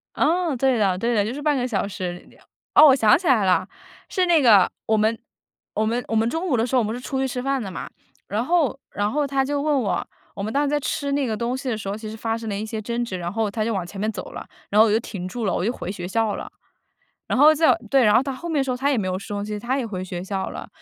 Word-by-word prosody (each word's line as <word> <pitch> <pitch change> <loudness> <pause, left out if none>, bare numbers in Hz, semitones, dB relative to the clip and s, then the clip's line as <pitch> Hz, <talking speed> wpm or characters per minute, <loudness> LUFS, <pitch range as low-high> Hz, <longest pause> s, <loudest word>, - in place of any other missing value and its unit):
啊， 335 -2 +1
对 260 0 +2
的， 195 -4 +2
对 235 +5 0
的， 205 -3 +2
就 225 - -3
是 290 - -6
半 295 0 +2
个 250 -2 0
小 200 -5 -1
时。 180 -3 -6 0.5
哦， 305 - +9
我 270 - +7
想 225 -4 +5
起 350 +2 -5
来 230 -8 +4
了， 185 -1 +2 0.4
是 370 -2 +1
那 340 -3 +4
个， 215 -7 +6 0.2
我 220 - +2
们 220 +2 +2 0.6
我 215 - 0
们 235 +3 -1
我 225 - -2
们 225 +1 +2
中 325 +7 -2
午 285 - +2
的 225 - +2
时 255 - -2
候 250 - +5
我 - - 0
们 215 +1 -2
是 245 - -7
出 265 +1 -3
去 265 - +1
吃 250 -1 -4
饭 275 0 -1
的 200 - -5
嘛， - - -6 0.4
然 210 +4 -1
后 320 -4 +1
然 205 +1 -1
后 295 +2 +1
她 275 -1 +1
就 285 +1 -1
问 295 -2 +1
我， 195 -6 -1 0.3
我 195 - -5
们 215 - -3
当 285 - +2
时 290 - 0
在 295 0 +1
吃 280 0 -2
那 280 0 +1
个 220 - -1
东 235 +3 -2
西 265 0 -4
的 225 - -1
时 200 -2 -5
候， 200 - -2
其 215 -1 -7
实 220 - -7
发 225 0 -2
生 230 -1 -7
了 200 - -2
一 210 +2 -3
些 220 0 -5
争 235 +3 -2
执， 200 -6 -4
然 175 -1 -4
后 220 +1 -1
她 215 +1 -1
就 230 - -1
往 190 -4 -2
前 195 +3 -9
面 215 +2 0
走 195 -4 -7
了， - - -8 0.2
然 210 - +3
后 225 - +6
我 - - +1
就 220 - +3
停 195 -5 -6
住 230 +4 -4
了， 195 - +1
我 180 - -1
就 230 - +1
回 185 - -5
学 180 -3 -6
校 220 +1 0
了。 - - -7 0.8
然 - - 0
后 305 +3 +7
在 310 -4 +4 0.2
对， 270 -1 +5
然 210 -1 +5
后 235 - +5
她 275 0 -3
后 265 +7 -7
面 320 -3 0
的 - - +1
时 265 - -3
候 250 - -1
她 275 +3 +1
也 270 - +1
没 200 - -1
有 185 0 -1
收 205 +1 -5
心， 210 0 -4
她 250 +6 -1
也 255 - -2
回 190 -4 -5
学 180 -1 -5
校 190 -1 -3
了。 - - -8
230 Hz, 335 characters per minute, -23 LUFS, 205-270 Hz, 0.8 s, 哦